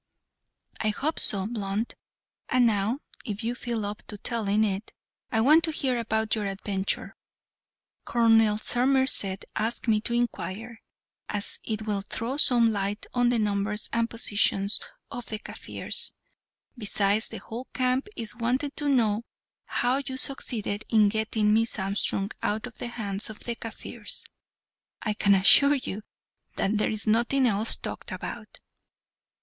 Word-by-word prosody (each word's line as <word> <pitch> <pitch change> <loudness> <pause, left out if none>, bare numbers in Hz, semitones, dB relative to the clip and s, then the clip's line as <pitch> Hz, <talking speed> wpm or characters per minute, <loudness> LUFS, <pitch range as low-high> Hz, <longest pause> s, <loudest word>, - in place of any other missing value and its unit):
"I 215 - +1
hope 290 +9 0
so, 195 -2 +4
Blunt. 210 0 -3 0.6
And 250 -1 +4
now, 220 +5 +1 0.2
if 215 -3 -5
you 235 +2 -1
feel 235 -3 -3
up 205 +1 -5
to 210 - -7
telling 215 -1 0
it, 200 0 -2 0.4
I 220 - +2
want 305 +7 +6
to 320 - -1
hear 265 -5 0
about 220 -1 0
your 210 -2 -1
adventure. 195 0 -3 0.9
Colonel 225 -2 +4
Somerset 245 -5 +2
asked 225 +3 0
me 215 -2 +3
to 235 - -2
inquire, 230 -1 -3 0.5
as 205 0 -1
it 220 -1 -3
will 205 -2 -1
throw 230 +6 -4
some 240 -5 +5
light 200 0 -2
on 245 -1 +3
the 245 - +2
numbers 210 0 -1
and 230 0 +1
position 205 -3 +1 0.4
of 245 -1 -6
the 215 - -3
Kaffirs; - - -1 0.6
besides, 210 -2 +1
the - - -6
whole 240 +3 -8
camp 255 +3 0
is 225 -1 -5
wanting 250 +4 -1
to 295 -1 +2
know 225 -5 +2 0.4
how 245 +2 +1
you 260 - -3
succeeded 220 -6 -1
in 215 -3 +5
getting 220 0 +1
Miss 225 +1 +1
Armstrong 195 0 +1
out 215 +2 -1
of 245 - -11
the - - -3
hands 210 -3 -4
of 215 - -8
the 235 - -2
Kaffirs. 225 -1 -5 0.8
I 215 - 0
can 200 -1 +4
assure 280 +9 +7
you 220 -6 -4 0.5
that 210 +2 0
there - - +2
is 215 -1 -1
nothing 235 +5 +3
else 220 -1 +3
talked - - -6
about." - - -7
220 Hz, 150 wpm, -27 LUFS, 205-240 Hz, 0.9 s, assure